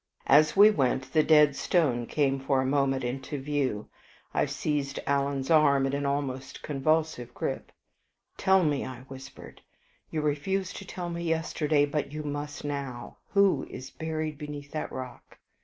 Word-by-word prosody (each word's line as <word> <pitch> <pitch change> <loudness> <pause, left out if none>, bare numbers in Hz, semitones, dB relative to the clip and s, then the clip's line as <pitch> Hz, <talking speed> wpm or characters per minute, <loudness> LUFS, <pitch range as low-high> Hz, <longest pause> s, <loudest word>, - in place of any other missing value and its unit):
As 150 +3 +5
we 210 +2 +9
went, 130 -5 0
the 155 - +5
Dead 150 -2 +5
Stone 130 -11 +1
came 135 -2 +1
for 135 0 +1
a 130 - +1
moment 135 -1 +1
into 135 +4 -4
view. 135 -6 -1 0.5
I - - +2
seized 145 -2 -2
Alan's 140 0 0
arm 140 -4 +5
in 135 - -1
an 140 0 -1
almost 135 -2 -3
convulsive 150 -4 0
grip. - - -4 0.6
"Tell 190 -1 +4
me," 145 -3 +1
I 130 -1 -7
whispered, 135 0 -12 0.5
"you 155 - -2
refused 175 +6 -1
to 195 - -8
tell 175 -2 -5
me 170 0 -4
yesterday, 160 -2 +1
but 145 0 -2
you 150 +1 -5
must 145 0 -5
now, 140 -4 -5 0.2
who 200 -8 +3
is 130 - -8
buried 155 -2 -4
beneath 145 -1 -7
that 155 - -4
rock?" 130 -2 -8
145 Hz, 155 wpm, -28 LUFS, 135-155 Hz, 0.6 s, we